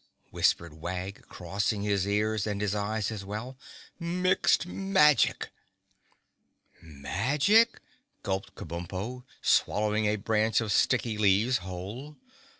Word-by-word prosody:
whispered 85 -2 +1
Wag, 95 +3 -5
crossing 100 +3 -2
his 100 -2 0
ears 105 +1 0
and 105 -1 -2
his 105 -1 -1
eyes 105 +1 -2
as 105 -3 -6
well. 110 +6 -6 0.4
"Mixed 180 +1 +1
Magic!" 180 - +2 1.3
"Magic?" 135 - +2 0.4
gulped 95 -1 -3
Kabumpo, 95 +9 -6 0.2
swallowing 105 +1 +2
a 105 - +2
branch 110 +1 +1
of 110 -3 -2
sticky 115 0 +1
leaves 105 +5 +3
whole. 95 +11 -8
105 Hz, 105 wpm, -28 LUFS, 95-125 Hz, 1.3 s, leaves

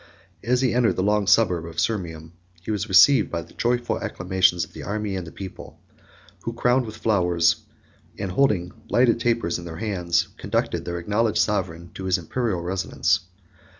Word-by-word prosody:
As 125 +3 +1
he 130 -3 +2
entered 120 -2 +2
the 95 - -1
long 105 0 +1
suburb 95 -5 +3
of 85 0 -6
Sirmium, 85 -5 -2 0.3
he 110 - -3
was 105 -3 -2
received 105 +6 +6
by 85 - -3
the - - -18
joyful 120 0 0
acclamations 95 -4 +1
of - - -22
the - - -8
army 105 0 -3
and 90 -3 -6
people; 95 -2 -9 0.6
who, 115 - -4
crowned 125 +1 +2
with 110 0 -8
flowers, 90 -6 +2 0.6
and 95 -2 -3
holding 90 -6 +1 0.2
lighted 120 -1 +3
tapers 115 -7 0
in 85 - -9
their 80 -1 -7
hands, 90 -6 0
conducted - - -2
their 85 0 -3
acknowledged 105 +5 0
sovereign 85 -5 -1
to 95 - -7
his 95 0 +2
Imperial 90 +1 -2
residence. 90 +2 0
95 Hz, 170 wpm, -24 LUFS, 85-115 Hz, 0.6 s, received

